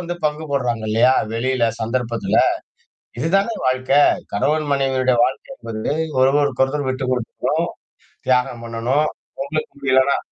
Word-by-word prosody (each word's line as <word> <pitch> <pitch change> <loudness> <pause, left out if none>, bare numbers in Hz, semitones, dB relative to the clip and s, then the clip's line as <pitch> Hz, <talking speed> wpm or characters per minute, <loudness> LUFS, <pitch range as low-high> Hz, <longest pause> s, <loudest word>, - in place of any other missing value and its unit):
வந்து 175 0 -4
பங்கு 150 +1 -3
போடுறாங்க 120 -5 -1
இல்லயா! 120 +4 +4 0.2
வெளியில 125 +1 +1
சந்தர்ப்பத்துல. 115 0 0 0.8
இதுதானே 195 +8 +1
வாழ்க்கை. 130 +2 +3 0.3
கணவன் 145 +8 +1
மனைவியருடைய 130 -2 +1
வாழ்க்கை 130 - -5
என்பது 110 +3 -3 0.3
ஒருவருக்கொரு 135 -1 +3
ஒருத்தர் 145 0 -2
விட்டு 130 0 -2
கொடுத்துப்போம், 125 -3 -1 0.6
தியாகம் 125 -2 +1
பண்ணணும். 120 +6 0 0.3
ஒடம்புக்கு 155 +3 -3
முடியலானா 130 0 +3
130 Hz, 115 wpm, -20 LUFS, 120-145 Hz, 0.8 s, இல்லயா